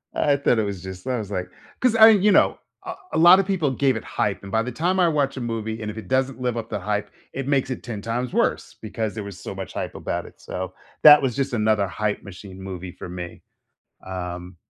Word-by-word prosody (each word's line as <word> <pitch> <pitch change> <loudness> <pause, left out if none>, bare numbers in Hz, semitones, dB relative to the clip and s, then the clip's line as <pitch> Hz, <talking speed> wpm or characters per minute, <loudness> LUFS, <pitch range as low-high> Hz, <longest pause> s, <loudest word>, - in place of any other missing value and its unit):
I 145 -1 +2
thought 130 -4 +2
it - - +2
was 100 -3 -4
just 95 +3 -8
I 125 - 0
was, 105 -3 -6
like 90 -2 -3 0.3
'cause 250 -3 +2
I 220 0 +9
you 210 -1 +5
know, - - +4 0.3
a - - -4 0.2
a - - 0
lotta 175 +4 +8
people 180 -8 0
gave 130 0 +1
it 110 - -5
hype 100 -1 -2
and 100 - -9
by 110 - +2
the 125 - -4
time 180 +9 0
I 180 - +5
watch 145 -4 0
a - - -4
movie 115 -1 -4
and 105 - -4
if 105 - -12
it 110 - -8
doesn't 130 -1 0
live 125 -2 -1
up 115 -1 -5
the 105 - -3
hype, 105 +2 -2 0.2
it 135 -1 -4
makes 135 -2 +1
it - - -5
10 110 -4 -6
times 120 +3 -3
worse - - 0
because 110 0 -4
there 110 - -4
was 100 -2 -9
so 95 - -7
much 95 0 -7
hype - - -4
about - - -3
it, - - -15
so, 95 0 -5 0.3
that 150 -1 +10
was 130 -4 -1
just 135 -2 -1
another 110 -3 +2
hype 105 +4 -2
machine 95 0 -11
movie 95 -1 -7
for - - -9
me. 90 -1 -7 0.7
Um, 90 -1 -6
110 Hz, 245 wpm, -23 LUFS, 95-135 Hz, 0.7 s, that